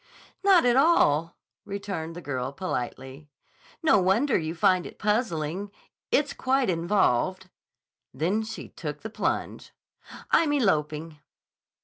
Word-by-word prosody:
"Not 385 -7 +5
at 245 -1 +4
all," 170 - +3 0.3
returned 195 -5 -5
the 175 - -8
girl 130 -2 -3
politely. 135 -3 -5 0.5
"No 310 -10 +5
wonder 210 +9 +2
you 160 +1 -1
find 185 -1 +2
it - - -13
puzzling. 200 -4 -1 0.4
It's 290 -1 +1
quite 260 -4 +1
involved." 185 0 +1 0.6
Then 175 +10 0
she 220 +1 -7
took - - -7
the - - -7
plunge. - - -3 0.6
"I'm 310 -3 +4
eloping." 155 - 0
185 Hz, 115 wpm, -26 LUFS, 155-225 Hz, 0.6 s, Not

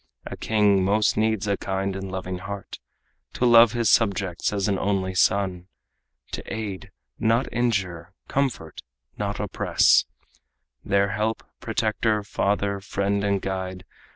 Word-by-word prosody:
A - - -6
king 105 -3 +2
most 105 +3 +2
needs 110 -1 0
a 100 -1 +1
kind 95 0 -2
and 95 -1 -5
loving 95 -1 -4
heart 100 +1 -7 0.5
To 125 - 0
love 115 -1 +7
his 120 -2 0
subjects 100 -4 +2
as 100 -1 -1
an 100 -2 0
only 95 -2 -1
son, 95 -1 +1 0.6
To - - -4
aid 105 -4 -5 0.3
not 115 +3 +2
injure, 95 -8 -1 0.2
comfort 135 -4 -2 0.4
not - - -2
oppress, - - +3 0.8
Their 100 0 +2
help, 110 +1 -2 0.2
protector, 110 -1 0
father, 100 0 -1
friend 100 +1 -1
and 100 -1 0
guide. 95 -1 -4
100 Hz, 130 wpm, -24 LUFS, 95-110 Hz, 0.8 s, love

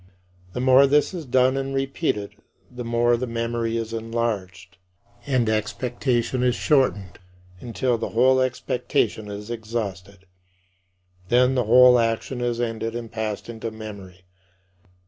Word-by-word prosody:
The - - -4
more 130 +2 +6
this 145 +6 +2
is 165 -6 -6
done 130 +1 +3
and 135 0 -3
repeated, 135 -6 -2 0.4
the 125 0 -7
more 120 +1 +2
the 125 +2 -3
memory 115 0 -2
is 115 0 -4
enlarged 105 -5 -4 0.5
and 130 -4 +1
expectation 120 +3 -1
is 125 -1 +2
shortened 105 - +1 0.4
until 120 +2 -1
the - - -3
whole 130 +3 +3
expectation 125 -3 -1
is 105 +2 -7
exhausted. 100 -4 -5 1.0
Then 125 +2 +4
the 125 -3 0
whole 125 +2 +7
action 115 +2 -1
is 120 -1 -1
ended 115 -1 -3
and 115 -2 -6
passed 110 -2 -4
into 115 -1 -5
memory. 100 -4 -10
115 Hz, 130 wpm, -23 LUFS, 110-125 Hz, 1.0 s, whole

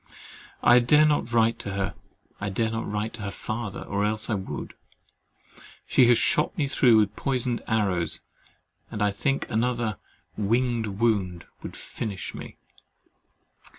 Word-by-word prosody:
I 120 +1 +7
dare 150 +6 +5
not 145 -6 +1
write 115 -1 +3
to 100 - -5
her, 95 -1 -2 0.5
I 100 - -2
dare 110 +3 0
not 115 -2 -3
write 105 +2 -2
to 120 - -8
her 100 - -3
father, 110 0 -5
or 100 0 -2
else 110 +1 0
I - - +2
would. 95 -2 -5 1.1
She 125 - +5
has 120 -1 +6
shot 160 - +1
me 145 -4 +1
through 125 -4 +5
with 105 -1 +2
poisoned 125 -3 0
arrows, 95 -7 0 0.7
and 105 -2 -2
I 105 - +3
think 135 +7 -1
another 115 -1 0 0.4
"winged 115 +2 +1
wound" 100 -5 0 0.2
would - - -8
finish 100 -5 -5
me. - - -9
110 Hz, 150 wpm, -26 LUFS, 100-120 Hz, 1.1 s, I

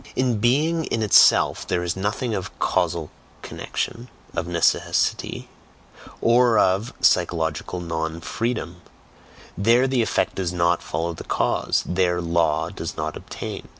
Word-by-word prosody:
In 125 -4 +1
"being 155 +8 +2
in 115 - -1
itself" 105 - +5
there 90 - 0
is 85 +1 -2
nothing 105 +5 -2
of 95 -3 -3
"casual 85 -4 0 0.3
connection," 120 +2 -5 0.2
of - - -3
"necessity," 85 -1 0 0.7
or 120 -1 +4
of 100 +6 +2
"psychological 85 -1 +1
non 80 -1 -3
freedom"; 90 -2 -3 0.7
there 115 +6 +3
the 130 -2 +1
effect 115 - 0
does 90 -3 -2
NOT 85 -1 +1
follow 85 +2 -3
the - - -9
cause, - - 0
there 90 -1 +1
"law" 85 -3 +1
does - - -6
not - - -3
obtain. - - -7
90 Hz, 130 wpm, -23 LUFS, 85-115 Hz, 0.7 s, itself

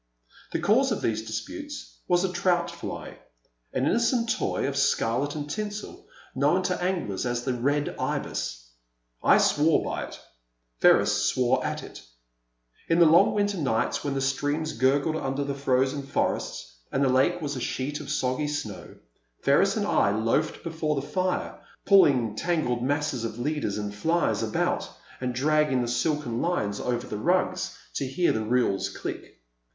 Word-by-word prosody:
The - - 0
cause 260 +6 +3
of 215 - -2
these 110 -1 0
disputes 290 - -6
was 175 0 +3
a 185 -1 -1
trout 175 -2 +1
fly, 170 - -7 0.5
an 130 - 0
innocent 235 - +2
toy 215 - -1
of 140 - -3
scarlet 140 +1 +1
and 145 -1 -4
tinsel, 215 - -5 0.3
known 145 +8 +2
to 180 0 -1
anglers 175 - -1
as 120 -1 -1
the 130 - -1
Red 140 +4 0
Ibis.*' - - -3 0.5
I - - +6
swore 155 +2 +3
by - - -3
it, - - -11 0.6
Ferris - - +4
swore 130 0 +2
at - - -3
it. - - -10 0.9
In 165 - +2
the 170 - +7
long 165 +2 +6
winter 205 -2 0
nights 120 -7 0
when 140 -1 -2
the 135 - -1
streams 145 +3 -1
gurgled 140 +6 +2
under 135 -1 -2
the 140 0 -2
frozen 135 0 +1
forests - - -2
and 135 - +1
the - - +4
lake 135 +7 +3
was 145 -3 -3
a 130 - -4
sheet 140 +5 -3
of 140 - -8
soggy 140 0 0
snow, 115 -10 -5 0.5
Ferris - - +3
and - - 0
I - - +3
loafed 115 +9 0
before 160 -2 -1
the 140 0 -3
fire 185 -1 -2 0.3
pulling 135 - +5
tangled 155 -5 0
masses 140 -2 -1
of 115 -1 -4
leaders 145 -5 -2
and 105 -1 -4
flies 165 +11 +1
about - - -1 0.3
and 125 -1 -3
dragging 150 -1 +2
the - - -2
silken 120 0 -1
lines 105 -13 -1
over 125 0 -2
the 105 -4 -5
rugs 185 +4 0 0.2
to 135 - -2
hear 170 +7 +1
the 110 - -1
reels 110 -4 +1
click. - - -7
145 Hz, 165 wpm, -26 LUFS, 125-170 Hz, 0.9 s, the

